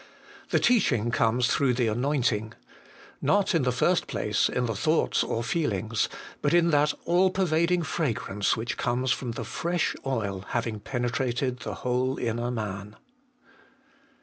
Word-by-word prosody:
The - - +3
teaching 125 - +2
comes 120 +1 +2
through 130 -3 +2
the 125 -1 +1
anointing. 115 -2 0 0.7
Not, 200 -1 +2
in 165 - +3
the 125 -1 +1
first 170 +8 +1
place, 105 0 0
in 125 - -1
the 115 - -1
thoughts 155 +10 +1
or 115 - -2
feelings, 115 - -1 0.3
but 145 +3 +2
in 170 -1 +4
that 150 0 +3
all 180 +2 +4
pervading 175 -1 +1
fragrance 115 - -1
which 115 +2 -3
comes 125 +1 0
from 125 -2 -2
the - - -5
fresh 175 0 -1
oil 100 -8 -2
having 115 -3 -2
penetrated 125 +2 -2
the - - -5
whole 125 +1 0
inner 120 0 -2
man. 105 -3 -5
125 Hz, 145 wpm, -27 LUFS, 115-150 Hz, 0.7 s, in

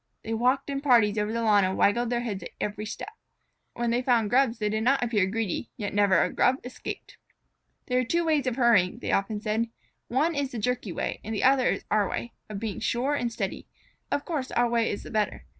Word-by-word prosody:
They 225 - -3
walked 255 +5 +1
in 275 0 -2
parties 230 -7 +4
over 210 +1 -1
the 230 0 -1
lawn 210 -2 +5
and 190 0 0
waggled 235 +4 +3
their 240 0 0
heads 205 -6 -4 0.2
at 205 0 -3
each 215 0 -4
step. 425 - -7 0.6
When 235 -1 0
they 240 +1 +1
found 235 -5 +2
Grubs 250 -2 +3
they 210 -2 -1
did 215 +1 -1
not 260 +3 +2
appear 215 -6 +2
greedy, 220 +1 -2
yet 205 -4 -4
never 200 -3 +4
a - - -2
Grub 255 - +3
escaped. 250 - -7 0.7
"There 250 0 +1
are - - +2
two 335 +8 0
ways 300 -5 +1
of 250 - 0
hurrying," 230 -8 +3
they - - -3
often 205 +1 0
said. 220 +2 -1 0.4
"One 295 +7 +1
is 285 -3 -2
the - - -3
jerky 240 -2 -1
way - - -3
and 220 +2 -4
the - - -1
other 260 -1 +4
is - - -2
our 210 -2 +2
way, 235 - -4 0.2
of 205 -2 -5
being 215 -2 -4
sure 255 +4 0
and 245 -5 -1
steady. - - -4 0.4
Of 285 - -1
course 290 -6 -3
our 240 0 +2
way 235 -1 +1
is 200 - -4
the - - -10
better. 215 -2 -1
235 Hz, 230 wpm, -27 LUFS, 210-255 Hz, 0.7 s, lawn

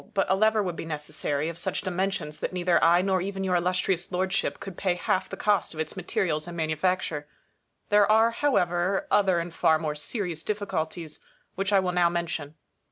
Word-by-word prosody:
But 195 - +3
a - - +5
lever 215 +1 +3
would 180 -3 -3
be - - -5
necessary, 150 -1 -3
of 165 0 -5
such - - -2
dimensions 185 -4 -2
that - - -3
neither 180 -1 +2
I 175 +2 +5
nor 190 -1 +1
even 195 +1 -3
your 185 -1 0
Illustrious 180 0 0
Lordship 185 +1 -1
could 195 -3 -8
pay 185 -1 0
half 185 +1 -1
the - - -6
cost 205 -5 +1
of - - -8
its 160 -1 -3
materials 175 -4 -1
and 170 0 -7
manufacture. 155 -1 -1 0.6
There 205 0 +5
are, 225 +1 +5
however, 195 - +1
other 190 -3 +4
and 170 0 -3
far 160 -1 +3
more 155 -1 -2
serious 170 +1 -4
difficulties, 170 -6 -3 0.3
which 195 +2 -2
I 200 - +5
will 185 -1 0
now 175 -1 +3
mention. 165 -3 -3
180 Hz, 190 wpm, -27 LUFS, 165-195 Hz, 0.6 s, a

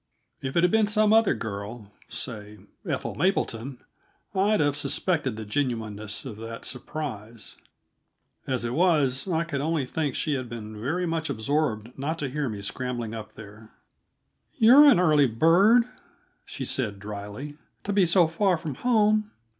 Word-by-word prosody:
If 135 +4 -3
it 170 - +4
had 180 - +4
been 220 -1 +3
some 215 0 +3
other 225 - +4
girl 105 0 -6 0.2
say 105 -4 -6 0.3
Ethel - - -2
Mapleton 135 - -1 0.6
I'd 205 +2 +2
have 145 -2 +2
suspected 145 - -1
the 110 0 -6
genuineness 110 -4 -3
of 115 -6 -7
that 115 +1 -7
surprise; 120 -5 -6 0.9
as 130 -3 0
it 120 - -2
was, 150 -4 +2
I 165 -2 +1
could 150 -5 -3
only 155 -2 0
think 145 0 -2
she 150 - -1
had 130 -3 -3
been 110 -2 -7
very 165 +9 -1
much 165 -2 -2
absorbed 125 -2 -1
not 155 +4 -2
to 145 -4 -3
hear 145 0 -2
me 105 -2 -6
scrambling 120 0 -3
up 110 -1 -8
there. 110 +1 -13 0.9
"You're 255 +7 +8
an 275 -11 +7
early 155 -5 +4
bird," 175 - +5 0.6
she 135 - -6
said 115 -6 -2
dryly, 105 +9 -7 0.2
"to 205 - -2
be 195 -3 +4
so 170 0 +4
far 180 +2 +1
from 155 -2 -5
home." 215 -3 +3
140 Hz, 155 wpm, -26 LUFS, 115-170 Hz, 0.9 s, You're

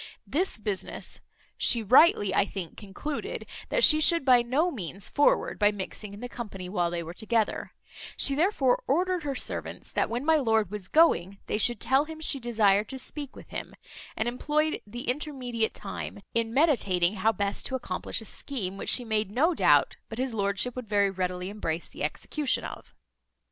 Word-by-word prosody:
This 360 +6 0
business, 210 -3 -3 0.4
she 230 -2 +3
rightly 220 - +5
I - - +4
think 190 -4 -6
concluded, 220 +9 -5 0.2
that - - +1
she 310 0 +7
should 335 -1 +4
by 250 -2 +6
no 280 +9 +1
means 195 - -5
forward 290 - +2
by 205 0 +5
mixing 205 +1 -7
in 205 +2 -10
the 245 - -4
company 210 -7 -7
while 180 -2 0
they 170 0 -3
were 165 +1 -8
together; 220 +2 -1 0.4
she 275 - +3
therefore 285 -5 +2
ordered 360 +5 +1
her 285 -3 -3
servants, - - -3
that - - +1
when 240 +4 -3
my 320 0 +5
lord 220 - +1
was 205 -3 -5
going, 200 - +3
they 210 - -1
should 240 0 +1
tell 270 +6 +2
him 320 0 -9
she 295 -3 +1
desired 215 -4 +2
to 265 - -6
speak 280 +2 -7
with - - -13
him; - - -7 0.4
and 220 - 0
employed 305 +5 0
the 240 +4 -7
intermediate 250 -4 -2
time 205 0 -6
in 230 -1 0
meditating 210 - +2
how 220 +4 +3
best 200 -1 -2
to 260 - -3
accomplish 230 -4 -4
a - - -10
scheme, 200 -7 -5
which - - -4
she 245 - +3
made 220 -3 0
no 290 - +2
doubt - - +3
but 225 - -7
his 260 -1 -2
lordship 200 +3 -1
would 250 -4 -7
very 200 -2 +3
readily 180 -1 -3
embrace 170 -5 -3
the - - -12
execution 295 -4 -1
of. - - -9
230 Hz, 185 wpm, -28 LUFS, 200-275 Hz, 0.4 s, she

